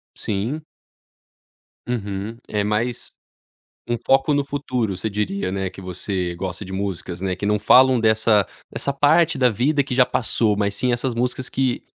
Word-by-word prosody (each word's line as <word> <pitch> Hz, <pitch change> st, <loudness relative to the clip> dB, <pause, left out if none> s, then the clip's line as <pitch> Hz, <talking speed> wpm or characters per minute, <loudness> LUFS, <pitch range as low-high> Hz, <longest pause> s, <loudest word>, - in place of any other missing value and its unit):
Sim. 115 Hz, +10 st, -3 dB, 1.2 s
Uhum, 105 Hz, -1 st, -4 dB
é 105 Hz, -1 st, -1 dB
mais 110 Hz, +4 st, -2 dB, 0.8 s
um 120 Hz, -, +1 dB
foco 135 Hz, +2 st, +4 dB
no 145 Hz, -1 st, +1 dB
futuro 125 Hz, -8 st, -2 dB
você 105 Hz, +4 st, -3 dB
diria, 100 Hz, -2 st, -2 dB
né. 95 Hz, 0 st, -2 dB
Que -, -, -12 dB
você 90 Hz, -1 st, -3 dB
gosta 95 Hz, +2 st, -5 dB
de 95 Hz, -, -9 dB
músicas, 95 Hz, -3 st, -4 dB
né, 95 Hz, -1 st, -1 dB
que 95 Hz, +3 st, -4 dB
não 105 Hz, 0 st, +2 dB
falam 130 Hz, +4 st, +6 dB
dessa 110 Hz, -2 st, +3 dB, 0.2 s
dessa 140 Hz, -, -1 dB
parte 150 Hz, +2 st, +3 dB
da 125 Hz, -1 st, +5 dB
vida 140 Hz, +7 st, +1 dB
que 135 Hz, -2 st, -4 dB
já 125 Hz, 0 st, +5 dB
passou, 110 Hz, -3 st, +1 dB
mas 100 Hz, -1 st, 0 dB
sim 125 Hz, +4 st, 0 dB
essas 120 Hz, +1 st, -1 dB
músicas 125 Hz, +2 st, -2 dB
que 130 Hz, -2 st, -1 dB
110 Hz, 165 wpm, -22 LUFS, 100-130 Hz, 1.2 s, falam